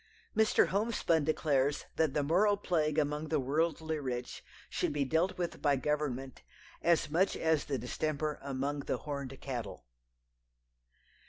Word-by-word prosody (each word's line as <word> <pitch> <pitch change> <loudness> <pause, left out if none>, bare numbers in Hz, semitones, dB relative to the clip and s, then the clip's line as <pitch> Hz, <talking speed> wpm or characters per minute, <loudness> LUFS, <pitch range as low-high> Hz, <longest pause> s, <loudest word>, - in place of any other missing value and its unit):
Mr. 220 -1 +4
Homespun 200 -6 +1
declares 145 -2 +1
that 160 -3 +1
the 145 - +2
moral 200 +7 +3
plague 155 -6 0
among 150 +1 0
the 155 -1 +1
worldly 160 +3 0
rich 125 -3 -4 0.2
should - - -1
be 145 -1 0
dealt 170 +7 +1
with 175 -1 -3
by 145 -2 +3
Government 135 -2 -2 0.4
"as 170 -3 +2
much 180 +5 +2
as 160 -2 +1
the 140 - -1
distemper 150 +4 -2
among 140 +1 -2
the - - -2
horned 140 -3 -5
cattle." 120 - -5
150 Hz, 140 wpm, -32 LUFS, 140-160 Hz, 0.4 s, Mr